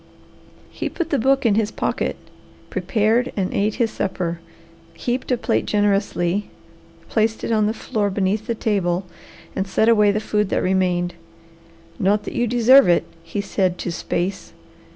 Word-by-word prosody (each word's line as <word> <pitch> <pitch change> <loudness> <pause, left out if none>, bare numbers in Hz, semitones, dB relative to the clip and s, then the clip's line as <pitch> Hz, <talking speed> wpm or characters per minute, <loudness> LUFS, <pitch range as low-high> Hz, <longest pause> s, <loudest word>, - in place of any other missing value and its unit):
He - - -4
put 340 -1 -4
the 285 - +2
book 270 +2 +2
in 225 - +4
his 215 0 +1
pocket, - - -2 0.6
prepared 230 +3 +1
and 190 -2 -1
ate 210 +1 0
his 230 -2 0
supper, 175 -3 -3 0.6
heaped 250 +9 -3
a 250 - +3
plate 110 - 0
generously, 200 -2 +1 0.6
placed 220 0 0
it - - -2
on 215 -2 +3
the 215 - 0
floor 210 -2 -1
beneath 200 +3 -1
the 235 - -1
table, 190 -4 0 0.5
and 190 - -1
set 220 +3 +2
away 210 -3 +5
the 210 - 0
food 210 -2 0
that - - 0
remained. 180 -2 +1 0.9
"Not 205 +2 +2
that - - -6
you 240 - 0
deserve 245 +3 +6
it," 175 - +4 0.2
he 200 +4 -4
said 190 -2 0
to 175 - -4
space. 180 +3 -3
210 Hz, 160 wpm, -21 LUFS, 190-225 Hz, 0.9 s, deserve